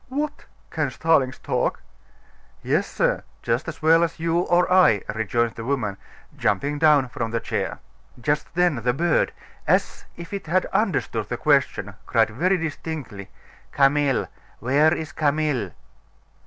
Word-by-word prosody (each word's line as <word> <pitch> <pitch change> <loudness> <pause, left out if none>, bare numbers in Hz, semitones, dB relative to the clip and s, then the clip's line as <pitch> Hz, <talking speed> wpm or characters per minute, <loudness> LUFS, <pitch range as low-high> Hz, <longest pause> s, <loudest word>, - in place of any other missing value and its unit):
"What! 290 +3 -3 0.3
can 155 -4 -1
starlings 135 -2 +1
talk?" - - -2 0.8
"Yes, - - +1
sir, - - 0 0.2
as 125 +7 -2
well 165 +1 +5
as 165 -1 -3
you 165 +1 +1
or 175 0 +3
I," 180 - +5
rejoined 115 +2 0
the 115 - -7
woman, 115 -6 -1 0.4
jumping 140 +9 0
down 150 -4 +5
from 115 -1 -3
the 115 +1 -1
chair. - - -3 0.4
Just 150 +3 -1
then 175 -5 +2
the 120 +2 0
bird, 170 +4 +1 0.4
as - - +1
if 170 +3 -9
it 200 -4 -5
had 185 +4 +2
understood 135 - 0
the 120 - -2
question, 135 -9 +1
cried 115 -2 +2
very 180 - +1
distinctly: 150 - -6 0.4
"Camille! 140 -1 +2 0.3
Where 140 +7 +3
is 160 -2 -3
Camille?" 145 - 0
145 Hz, 140 wpm, -23 LUFS, 120-165 Hz, 0.8 s, well